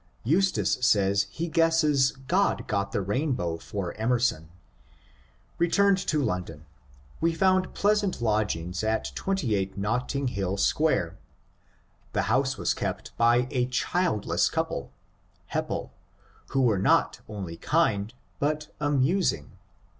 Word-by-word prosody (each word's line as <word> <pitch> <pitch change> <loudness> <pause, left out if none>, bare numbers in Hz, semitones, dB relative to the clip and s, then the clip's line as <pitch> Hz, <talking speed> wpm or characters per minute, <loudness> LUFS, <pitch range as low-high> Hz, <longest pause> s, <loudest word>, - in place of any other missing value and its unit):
Eustace 130 - +2
says 100 -3 +3
he 165 +11 -4
guesses 160 -4 +3
God 195 +6 +1
got 100 -2 -1
the 100 - -1
rainbow 105 - -1
for 95 0 -5
Emerson." 115 -9 0 1.1
Returned 195 +3 +3
to 155 -5 0
London, 90 - -3 0.5
we 165 0 +1
found 185 +1 +2
pleasant 205 -4 +1
lodgings 105 -5 -1
at 110 0 -1
28 110 - -1
Netting 125 +6 -1
Hill 100 -3 -2
Square. 95 - +1 0.9
The - - +1
house 135 0 +1
was - - 0
kept - - -4
by 120 +1 +3
a 125 -3 +1
childless 165 - 0
couple - - -3 0.6
(Hepple), - - -2 0.6
who 135 -1 +1
were 110 -6 +3
not - - +2
only 95 -6 -6
kind 110 - +1 0.3
but 150 +1 -2
amusing. 145 - +1
125 Hz, 115 wpm, -27 LUFS, 100-160 Hz, 1.1 s, says